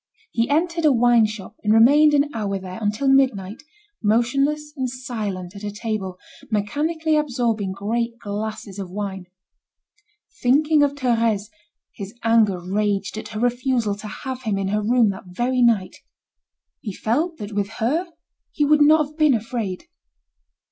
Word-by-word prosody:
He 230 +2 0
entered 335 +3 +1
a 305 - +5
wine 240 -2 +4
shop 210 -3 -9
and 210 - +2
remained 295 +6 +6
an 290 +1 +2
hour 205 -3 -2
there, 185 +1 -8
until 210 +6 -1
midnight, 245 -7 +2 0.4
motionless 275 +7 +1
and 260 -3 -2
silent 210 -7 -5
at 200 - -9
a 205 - -2
table, 205 -3 -4 0.3
mechanically 305 +10 0
absorbing 240 -9 0
great 230 +4 -2
glasses 205 -2 -5
of 190 -2 -5
wine. 190 -1 -5 1.1
Thinking 295 +4 +3
of 285 -1 +3
Thérèse, 230 -5 0 0.4
his 200 +2 -8
anger 225 -5 +3
raged 200 +2 -1
at 215 0 -6
her 215 0 -6
refusal 245 -2 0
to 210 +1 -8
have 260 +4 -6
him 215 -5 -1
in 195 -1 -1
her 210 +1 0
room 230 0 +3
that 190 0 -10
very 245 +7 -1
night. 215 -6 +2 0.8
He 205 - -6
felt 315 +9 -1
that 205 0 -7
with 200 0 -1
her 310 +11 0 0.4
he 295 - +1
would 300 +1 +4
not 305 +1 +6
have 300 +2 -16
been 305 -5 +4
afraid. 220 -4 -4
230 Hz, 155 wpm, -22 LUFS, 205-270 Hz, 1.1 s, remained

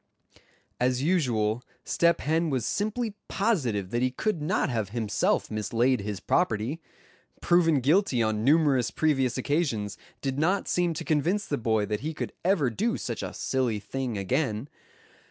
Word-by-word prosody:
As 125 +1 +1
usual 120 -10 +1 0.2
Step 170 0 +2
Hen 160 +2 +1
was 130 -6 -1
simply 215 - -1
positive 120 - 0
that 120 - 0
he 130 - +3
could 170 +6 -2
not 160 +5 +1
have 110 -7 -2
himself 110 -2 0
mislaid 115 +3 +1
his 100 -1 -4
property. 135 - 0 0.6
Proven 165 -5 +3
guilty 145 - +3
on 110 -1 0
numerous 140 -3 +3
previous 135 -6 +1
occasions 130 - -1 0.2
did 135 0 -2
not 185 +6 +1
seem 175 -2 +1
to - - -5
convince 170 +7 +1
the 145 - -2
boy 110 -2 +1
that 105 0 -2
he 155 +5 -4
could - - -4
ever 170 -9 +2
do 230 - 0
such - - -4
a - - -4
silly 125 -5 -1
thing 125 +2 -4
again. 125 +4 -1
135 Hz, 155 wpm, -27 LUFS, 115-165 Hz, 0.6 s, he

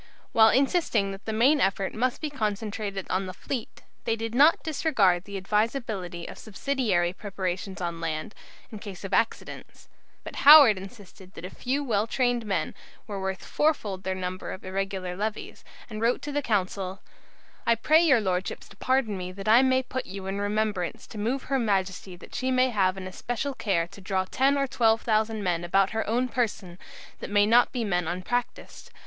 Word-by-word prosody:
While 220 0 +6
insisting 265 - +2
that 195 +1 -10
the 220 - -2
main 255 +7 +3
effort 195 0 0
must 250 +3 -1
be 305 -2 -3
concentrated 210 -4 -3
on 190 +1 0
the 185 - -7
fleet, 245 +1 -6 0.2
they 225 - +1
did 225 0 -5
not 290 +6 +5
disregard 220 - +2
the 200 -1 -6
advisability 210 -4 -2
of - - -9
subsidiary 210 -6 -1
preparations 190 -1 -4
on 170 -1 -3
land, 160 +4 -3 0.4
in 215 - -7
case 200 -2 -9
of 195 0 -6
accidents. 230 - -2 0.3
But - - -8
Howard 285 -9 +9
insisted 195 -2 -13
that 175 - -8
a 185 - -7
few 275 +3 -2
well 220 -4 0
trained 245 -2 0
men 175 -6 -1 0.3
were 200 -3 -5
worth 190 -2 -4
fourfold 220 -11 0
their 190 0 -2
number 185 0 -5
of 185 - -10
irregular 190 -1 -3
levies, 210 +2 -5 0.2
and 215 -2 -7
wrote 235 +2 +1
to 295 - -4
the 290 0 0
Council: 195 -4 -2 0.6
"I 235 - +5
pray 310 +8 +4
your 275 -9 +4
Lordships 185 -1 -2
to 200 - -16
pardon 255 -4 +1
me 180 -1 -5
that 195 +2 -8
I 225 +3 +7
may 260 0 +3
put 260 0 -5
you 190 0 -7
in 195 +1 -3
remembrance 205 -3 -2
to 215 - -9
move 245 +6 -1
her 270 -1 0
Majesty 190 -4 -1
that 175 - -14
she 260 - -2
may 255 0 +3
have 190 -3 +1
an 190 - -6
especial 245 +8 -4
care 195 -9 0
to 200 - -13
draw 190 -1 -1
ten 270 +8 +2
or 275 - +1
twelve 225 -4 +2
thousand 220 -1 0
men 175 -2 0
about 195 +3 +2
her 220 -1 -2
own 245 +3 +1
person, 215 -7 -3 0.4
that - - -6
may 205 0 +4
not 235 +3 +4
be 245 -3 -2
men 180 -5 0
unpractised. 185 +8 -4
210 Hz, 190 wpm, -26 LUFS, 190-245 Hz, 0.6 s, Howard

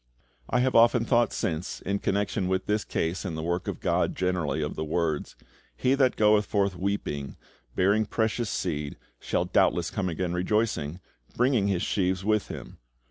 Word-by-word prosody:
I 125 - +2
have 130 0 +1
often 115 0 +5
thought 120 -1 +3
since, 80 +1 -3
in 100 +1 -2
connection 100 -1 0
with 95 0 0
this 105 0 0
case 80 +3 -2
and 85 -4 -4
the 80 - -4
work 85 +2 -2
of - - -3
GOD - - 0
generally, 90 -4 0
of 75 - -4
the 80 - -3
words, 80 -1 -1 0.4
"He 130 +1 +2
that 135 -2 +3
goeth 105 -1 +4
forth 100 -2 +1
weeping, 85 -7 -3 0.4
bearing 100 +3 +3
precious 110 +1 0
seed, 75 -5 -3 0.2
shall - - -1
doubtless - - +2
come 95 -2 -1
again 85 +1 -2
rejoicing, 90 -3 0 0.4
bringing 125 -5 +3
his 95 -3 0
sheaves 95 -1 0
with 110 -1 +1
him." - - -9
95 Hz, 170 wpm, -27 LUFS, 85-110 Hz, 0.4 s, often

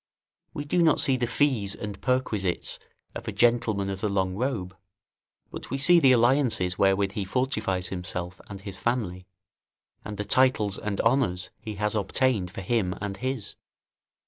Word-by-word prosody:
We 145 - -4
do 175 +4 +1
not 160 -3 +4
see 135 - +3
the 120 -1 -1
fees 120 -8 +1
and 105 -2 -7
perquisites 110 -8 -1 0.3
of - - -8
a - - -1
gentleman 115 -4 +2
of 95 0 -6
the 105 - 0
long 95 -2 0
robe; 100 -5 -2 0.8
but - - -8
we 135 - -2
see 170 +5 +6
the 135 -5 +6
alliances 120 -7 +3
wherewith 95 0 +2
he 105 -1 -3
fortifies 100 -5 -1
himself 90 -1 -5
and 100 -2 -8
his 100 -1 -8
family, 95 -7 -2 0.8
and 105 -1 -6
the 105 - -3
titles 110 -4 +2
and 100 -2 -3
honours 115 -8 +1
he 110 -1 -6
has 105 +1 -1
obtained 105 -1 +1
for 95 - -7
him 95 -2 0
and 100 -1 -4
his. 130 -2 -4
105 Hz, 165 wpm, -26 LUFS, 95-125 Hz, 0.8 s, see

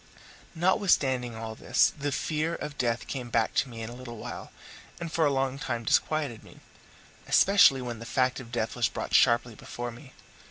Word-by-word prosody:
Notwithstanding 145 - +2
all 110 0 -6
this, - - +2
the 145 -1 -3
fear 155 +4 -1
of 150 - -6
death 120 -3 -1
came 125 -3 -5
back 115 -1 +1
to 135 - +1
me 115 -1 -7
in 110 - -5
a - - -8
little 120 -1 -9
while, - - -8 0.5
and 170 -2 -5
for 160 -2 +2
a - - +1
long 135 0 -1
time 120 -5 -3
disquieted 140 -2 0
me, - - -16 0.7
especially 170 -10 +5
when 120 -2 -5
the 115 - -8
fact 130 +1 +1
of 120 -3 -11
death 115 -2 -2
was 120 -2 +1
brought - - -6
sharply 120 -1 +4
before 120 +3 -6
me. 130 +3 -14
125 Hz, 190 wpm, -28 LUFS, 120-145 Hz, 0.7 s, especially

